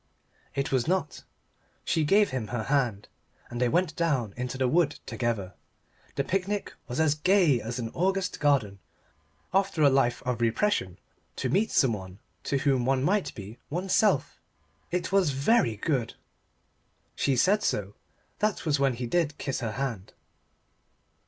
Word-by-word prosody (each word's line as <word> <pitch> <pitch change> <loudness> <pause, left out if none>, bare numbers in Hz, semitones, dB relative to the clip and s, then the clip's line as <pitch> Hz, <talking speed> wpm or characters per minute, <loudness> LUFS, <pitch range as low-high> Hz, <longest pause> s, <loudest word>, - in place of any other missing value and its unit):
It 140 - -1
was 130 -1 +1
not. 180 -3 -1 0.6
She 160 - +1
gave 200 +7 +4
him 125 -4 -3
her 115 0 -3
hand, 120 -7 0 0.4
and 120 +1 -4
they 125 - +3
went 175 +2 +1
down 135 -11 0
into 125 +1 -4
the 130 -1 +1
wood 150 +2 +2
together. 110 -6 -2 0.6
The 140 - 0
picnic 195 +6 -2
was 145 +4 +2
gay 155 - +3
as 115 +3 -5
an 115 -2 -3
August 190 +1 0
garden. 130 -10 +1 0.7
After 195 -4 +2
a 140 - +6
life 130 -3 +1
of 125 -1 -2
repression 115 - 0 0.4
to - - -2
meet 210 +4 +2
someone 95 -7 0 0.3
to 140 - +1
whom 135 -2 +1
one 130 +1 +1
might 200 +5 0
be 105 +4 -9
oneself! 185 +1 +1 0.5
It 180 +2 -2
was 195 -5 +3
very 135 - +2
good. 125 -1 -1 1.0
She 135 - +1
said 200 - +3
so. 100 -1 -1 0.5
That 210 -3 0
was 150 -3 +1
when 135 -2 +2
he 125 +1 -4
did 155 +2 0
kiss 135 - -3
her 115 -3 -3
hand. 115 -7 -4
140 Hz, 150 wpm, -27 LUFS, 120-175 Hz, 1.0 s, a